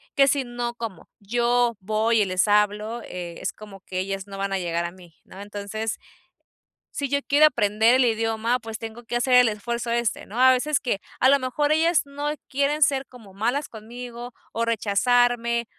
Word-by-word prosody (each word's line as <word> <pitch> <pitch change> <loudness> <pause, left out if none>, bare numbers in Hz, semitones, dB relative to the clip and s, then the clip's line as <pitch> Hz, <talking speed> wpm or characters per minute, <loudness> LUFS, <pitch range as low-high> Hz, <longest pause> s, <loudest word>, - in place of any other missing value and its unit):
que 275 0 +5
si 275 -1 +1
no 240 0 -4
como 230 -5 -7
yo 240 +2 +1
voy 220 +2 +1
y - - +3
les 185 +1 +1
hablo, 210 +2 +1
es 175 -2 -5
como 200 -2 -13
que 185 0 -5
ellas 195 +1 -4
no 195 -1 -8
van 195 0 -2
a - - +1
llegar 170 -1 -2
a 170 - -4
mí, 175 -2 -17
¿no? 190 - -12
Entonces, 205 +2 -4 0.9
si 280 -2 -3
yo 280 +1 +1
quiero 295 +2 +6
aprender 220 -2 +3
el 260 -1 +4
idioma, 225 +1 0
pues 225 -1 -7
tengo 225 +1 -8
que 240 - -5
hacer 245 +2 +1
el 250 -2 +7
esfuerzo 235 +3 -4
este, 235 -4 -1
¿no? 220 +5 -6
A 260 0 +7
veces 280 +3 +1
que 240 -7 -2 0.2
a 260 - +5
lo 280 +1 +5
mejor 265 +3 0
ellas 325 +2 +3
no 285 +1 -3 0.2
quieren 285 +2 +1
ser 275 -1 +1
como 225 -6 -15
malas 245 +9 -1
conmigo, 240 +2 -9 0.2
o 230 - -1
rechazarme, 235 +2 +2
235 Hz, 190 wpm, -24 LUFS, 205-250 Hz, 0.9 s, el